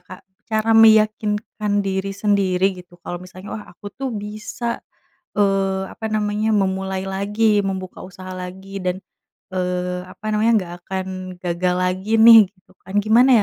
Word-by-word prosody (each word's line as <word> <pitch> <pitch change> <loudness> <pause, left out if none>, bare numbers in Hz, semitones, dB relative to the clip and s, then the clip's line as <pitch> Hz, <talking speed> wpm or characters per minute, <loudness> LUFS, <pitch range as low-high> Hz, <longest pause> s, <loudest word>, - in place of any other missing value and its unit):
Kak 180 +1 -13 0.2
cara 220 0 +1
meyakinkan 215 -2 +3
diri 195 0 -2
sendiri 195 -3 +1 0.2
gitu 180 0 -18
kalau 175 - -5
misalnya 185 +2 -11
wah - - -12
aku 205 +3 -10
tuh 270 0 -4
bisa, 215 +3 -5 0.6
eee, 195 -1 +1
apa 220 - -6
namanya 210 +1 0
memulai 190 -1 -1
lagi 205 +2 +1
membuka 185 -1 -5
usaha 185 0 -10
lagi 190 +2 -7
dan, 180 0 0 0.6
eee, 180 0 -2
apa - - -17
namanya 220 +2 +3
nggak 175 -3 -6
akan 190 -1 -3 0.4
gagal 180 +1 0
lagi 185 +3 -1
nih 230 0 +10
gitu 185 -1 -27
kan 190 +2 -11
gimana 240 +5 +5
195 Hz, 145 wpm, -21 LUFS, 185-215 Hz, 0.6 s, nih